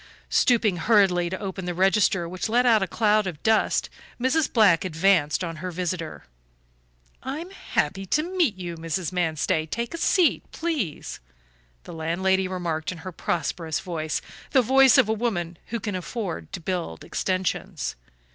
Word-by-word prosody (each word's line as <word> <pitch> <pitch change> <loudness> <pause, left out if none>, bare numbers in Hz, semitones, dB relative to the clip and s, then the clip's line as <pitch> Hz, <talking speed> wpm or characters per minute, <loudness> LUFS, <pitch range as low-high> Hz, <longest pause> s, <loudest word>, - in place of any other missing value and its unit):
Stooping 220 -7 +3
hurriedly 180 -3 +3
to 190 - -4
open 190 -2 -5
the 175 -1 -3
register, 190 -1 +3
which 185 +5 -4
let 245 +3 +3
out 225 -4 +5
a 195 - 0
cloud 210 +1 +2
of 160 -5 -6
dust, 220 -1 +2 0.3
Mrs. 260 +5 +1
Black 200 -9 +5
advanced 175 -2 +2
on 165 -2 -4
her 185 +3 -5
visitor. 175 -2 -4 1.0
"I'm 310 +8 -5
happy 195 - -2
to 305 +10 +2
meet 345 - +1
you, 175 -2 -6
Mrs. 165 +2 -3
Manstey; 160 -3 0
take 235 - -3
a 335 - -5
seat, 355 0 +3
please," 300 - -3 0.6
the - - -10
landlady 185 +4 0
remarked 170 -4 -3
in 180 - -7
her 185 - -4
prosperous 165 -1 -2
voice, 160 -4 -3 0.3
the 260 - +5
voice 265 +1 +6
of - - +5
a 220 - +1
woman 175 -7 -2
who 235 - -3
can 210 -1 -4
afford 185 0 -5
to - - -4
build 170 - -4
extensions. 185 -4 -2
185 Hz, 155 wpm, -25 LUFS, 170-225 Hz, 1.0 s, voice